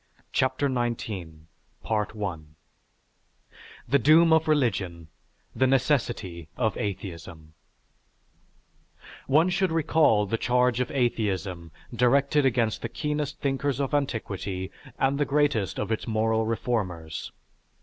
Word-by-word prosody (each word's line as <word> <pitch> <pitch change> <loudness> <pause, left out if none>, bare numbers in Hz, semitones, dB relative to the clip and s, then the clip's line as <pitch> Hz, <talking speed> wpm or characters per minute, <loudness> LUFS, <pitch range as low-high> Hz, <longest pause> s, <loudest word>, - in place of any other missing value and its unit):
CHAPTER 130 +2 +1
XIX 115 -9 -3 0.5
THE 105 -7 -3 1.5
DOOM 160 +2 +6
OF 160 0 +3
RELIGION; 95 - 0 0.5
THE 130 - +3
NECESSITY 120 - 0
OF 110 -5 0
ATHEISM 85 -5 -6 1.8
_One 160 +6 +4
should 185 -1 +1
recall 155 -9 +3
the 115 +3 -2
charge 125 -1 +2
of 125 - -1
atheism 100 -9 -1 0.3
directed 140 +4 +3
against 115 -4 0
the 115 - -4
keenest 150 +2 -3
thinkers 140 -1 -1
of 140 0 -2
antiquity 100 -9 -2 0.3
and 135 +1 +1
the 145 - +2
greatest 140 -9 +1
of - - -2
its 110 - -2
moral 110 0 +1
reformers. 95 -9 -3
120 Hz, 105 wpm, -26 LUFS, 100-140 Hz, 1.8 s, DOOM